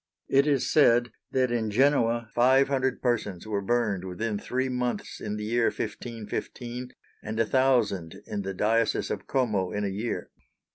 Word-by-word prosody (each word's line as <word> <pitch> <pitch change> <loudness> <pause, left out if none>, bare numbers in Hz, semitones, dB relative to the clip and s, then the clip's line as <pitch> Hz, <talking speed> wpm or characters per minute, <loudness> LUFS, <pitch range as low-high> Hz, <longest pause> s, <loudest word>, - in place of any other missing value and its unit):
It 140 +2 +4
is 140 -4 +2
said 120 -5 +4 0.2
that 130 -2 +1
in 115 -2 0
Genoa 120 -1 +2
five 130 +3 +4
hundred 130 -2 0
persons 105 -7 -1
were 105 -2 -1
burned 105 -3 0
within 100 +3 -3
three 130 +4 -1
months 125 -1 -3
in 105 -1 -3
the 105 - -4
year 115 +2 +2
1515, 120 +2 -4 0.3
and 110 +1 -4
a 115 - +4
thousand 115 -10 +2
in 105 -1 -3
the 95 0 -4
diocese 115 +4 +1
of - - -4
Como 105 -8 +1
in 105 - -2
a - - 0
year. 105 +5 -4
115 Hz, 160 wpm, -27 LUFS, 105-125 Hz, 0.3 s, It